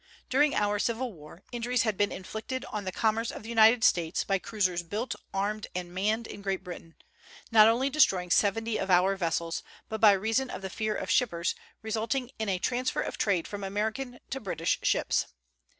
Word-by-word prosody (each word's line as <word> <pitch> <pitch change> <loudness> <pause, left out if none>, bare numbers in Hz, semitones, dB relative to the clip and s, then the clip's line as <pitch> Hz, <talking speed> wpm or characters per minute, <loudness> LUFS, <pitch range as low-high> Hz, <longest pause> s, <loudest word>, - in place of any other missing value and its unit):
During 290 +3 +3
our 205 0 +1
Civil 235 +2 -1
War, 155 +2 -14
injuries 240 0 0
had 220 -3 0
been 205 +2 +1
inflicted 220 +7 -5
on 210 -2 -4
the 185 - -2
commerce 225 +3 0
of - - -7
the 225 - -9
United 225 0 +5
States 170 -1 +2
by 195 -1 0
cruisers 185 -4 -1
built, 215 +8 -3 0.2
armed, 205 +2 -2
and 180 -1 -4
manned 215 +5 0
in 205 - -9
Great 195 -1 -2
Britain, 175 -2 -9 0.6
not 215 -1 +8
only 240 +4 +3
destroying 190 -11 +3
seventy 220 +3 +2
of 195 - -3
our 185 +2 +4
vessels, 165 -2 -1 0.3
but 220 -1 -4
by 210 -2 +8
reason 225 +7 0
of 185 - -7
the 190 - -4
fear 215 +1 -2
of - - -3
shippers, 175 -10 +1 0.3
resulting 230 +4 -2
in 220 -2 -1
a 190 - +1
transfer 250 +7 -1
of - - -5
trade 185 -6 +1
from 205 -1 -6
American 220 +6 -3
to 270 - -2
British 180 -7 -1
ships. - - +1
215 Hz, 190 wpm, -29 LUFS, 190-230 Hz, 0.6 s, not